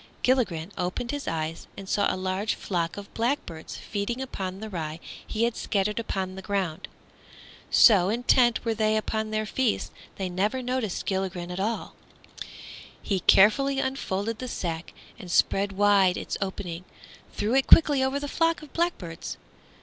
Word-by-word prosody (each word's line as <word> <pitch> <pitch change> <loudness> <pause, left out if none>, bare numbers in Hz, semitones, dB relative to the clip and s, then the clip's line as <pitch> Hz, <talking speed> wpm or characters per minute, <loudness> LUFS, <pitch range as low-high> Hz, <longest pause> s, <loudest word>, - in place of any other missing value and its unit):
Gilligren 205 -10 +1
opened 180 +7 -2
his 290 -1 -5
eyes 160 0 -3
and 195 - -8
saw 205 +1 +2
a - - -3
large 185 +3 -1
flock 170 -2 -2
of 200 0 -9
blackbirds 230 - -2
feeding 215 +4 -3
upon 190 -8 -4
the 220 - -6
rye 160 -5 -5 0.3
he 220 +1 -1
had 235 0 +1
scattered 210 +1 -1
upon 190 -4 -3
the 190 - -7
ground. 190 -5 -2 0.8
So 195 -5 +6
intent 240 +1 +3
were 230 - +1
they 215 0 +1
upon 220 0 -2
their 215 0 -1
feast 240 +1 0 0.2
they 190 - -3
never 205 +8 -1
noticed 250 -6 -2
Gilligren 190 -2 -2
at 180 - -5
all. 220 +4 -2 1.1
He 195 -2 -1
carefully 270 +10 +5
unfolded 230 -5 -2
the 255 - -4
sack, 170 -7 -4 0.3
and 185 -5 -9
spreading 195 +2 +2
wide 200 -3 +4
its - - -4
opening 185 -3 -4 0.5
threw 210 +3 0
it 270 0 +3
quickly 290 -4 +7
over 265 +2 0
the 290 - -4
flock 330 +2 +1
of 295 - -13
blackbirds. 265 - -3
205 Hz, 155 wpm, -26 LUFS, 185-240 Hz, 1.1 s, quickly